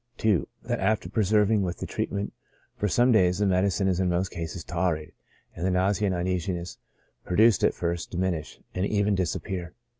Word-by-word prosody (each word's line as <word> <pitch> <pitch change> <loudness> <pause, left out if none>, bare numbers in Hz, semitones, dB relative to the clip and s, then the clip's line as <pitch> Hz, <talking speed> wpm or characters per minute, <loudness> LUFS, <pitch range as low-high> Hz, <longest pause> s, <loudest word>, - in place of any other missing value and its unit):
2. 105 -5 +2 0.2
That - - -2
after 105 -1 +1
persevering 105 0 +3
with 90 -2 -2
the - - -5
treatment 100 0 -3 0.4
for 105 - -1
some 120 +6 +3
days, 90 -5 +4
the 105 - +1
medicine 95 +1 +2
is 95 -1 +1
in 95 -1 +2
most 90 +1 0
cases 85 0 -5
tolerated, 85 -3 -2 0.4
and 85 - -6
the 95 - +2
nausea 95 +3 +2
and 95 - 0
uneasiness 90 0 -2 0.4
produced 110 +3 +4
at - - +3
first, 85 -1 -2
diminish, 90 -3 -2
and 90 - -1
even 105 0 +1
dis 95 -3 0
appear. 90 0 -5
95 Hz, 180 wpm, -27 LUFS, 90-100 Hz, 0.4 s, days